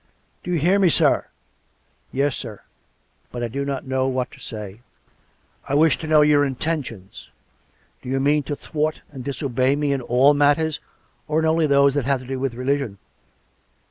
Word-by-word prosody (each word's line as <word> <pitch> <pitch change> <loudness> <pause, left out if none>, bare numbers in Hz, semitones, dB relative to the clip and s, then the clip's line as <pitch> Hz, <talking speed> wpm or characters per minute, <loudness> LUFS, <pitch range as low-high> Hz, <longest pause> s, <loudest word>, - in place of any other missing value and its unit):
" - - -42
Do - - -7
you 175 - +1
hear 180 +6 +3
me, 190 -3 +4
sir? - - +3 0.2
" - - -43
" - - -41
Yes, 140 +2 0
sir. 110 -5 -8 0.7
But 120 -1 -5
I - - 0
do 135 +5 -4
not 140 -1 -4
know 130 0 0
what 130 -1 -2
to - - -15
say." 105 -2 -8 0.4
" - - -26
I 140 - +1
wish 155 -1 +4
to 160 - -6
know 155 -1 +5
your 150 -1 +4
intentions. 130 - -4 0.7
Do - - -8
you 135 +1 0
mean 145 +2 +2
to 145 - -1
thwart 155 +1 -3
and 135 -3 -8
disobey 135 -1 0
me 145 -1 0
in 135 - -2
all 125 +4 +4
matters, 145 +2 +2 0.5
or 155 0 0
in 160 - +2
only 160 0 +2
those 140 -1 +4
that 145 -3 -1
have 135 -1 +1
to - - -11
do 130 +1 -4
with 130 -3 -2
religion.'' 130 -4 -2
140 Hz, 200 wpm, -22 LUFS, 130-150 Hz, 0.7 s, know